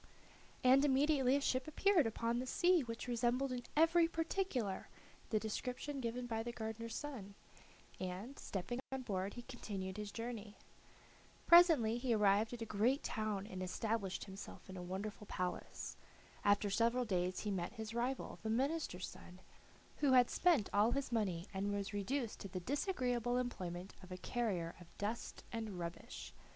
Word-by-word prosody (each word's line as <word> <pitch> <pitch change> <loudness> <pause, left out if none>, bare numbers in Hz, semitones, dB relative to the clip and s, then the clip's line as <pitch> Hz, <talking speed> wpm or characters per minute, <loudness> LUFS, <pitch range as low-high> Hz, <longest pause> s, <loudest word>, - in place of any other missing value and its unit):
And 260 +2 +7
immediately 275 -1 +4
a 285 - +2
ship 255 -1 +1
appeared 340 - +4
upon 230 +1 0
the 255 - -3
sea 355 +4 +4
which 230 -1 -5
resembled 245 +3 +1
in 250 -1 -2 0.2
every 330 +1 +6
particular 325 - -1 0.4
the 215 - +2
description 250 +6 -3
given 245 0 -2
by 225 -2 -1
the 240 +1 -3
gardener's 225 0 -5
son, 230 -10 -6 0.6
and, 190 +9 -5
stepping 200 +6 -3
on 265 -1 -3
board, 195 -3 -2
he 240 - -6
continued 200 -6 -5
his 210 -1 -4
journey. 225 -3 -5 0.9
Presently 315 -10 +7
he 245 -2 +2
arrived 210 +1 +4
at 240 -2 -4
a - - -4
great 225 +7 +2
town 215 -3 -1
and 185 -3 -6
established 195 +1 -1
himself 195 -1 -9
in 190 - -8
a 180 - -5
wonderful 200 +3 -5
palace. 180 -1 -3 0.5
After 205 0 +3
several 235 +4 +3
days 185 -3 0
he 210 - -2
met 180 0 -2
his 220 -1 -6
rival, 245 +3 -2
the 220 - -3
minister's 260 - 0
son, 180 +1 -12 0.6
who 280 -3 +3
had 250 -2 +6
spent 330 - +4
all 205 +3 +5
his 275 -2 -1
money 190 -7 0
and 195 +1 -1
was 205 0 -2
reduced 225 +4 -1
to - - -5
the 185 -1 -4
disagreeable 245 - 0
employment 185 -7 -3
of 185 -1 -12
a 180 - -4
carrier 185 -5 -1
of 170 - -16
dust 215 +3 -3
and 220 -5 -4
rubbish. 170 -1 -6
225 Hz, 165 wpm, -38 LUFS, 200-255 Hz, 0.9 s, And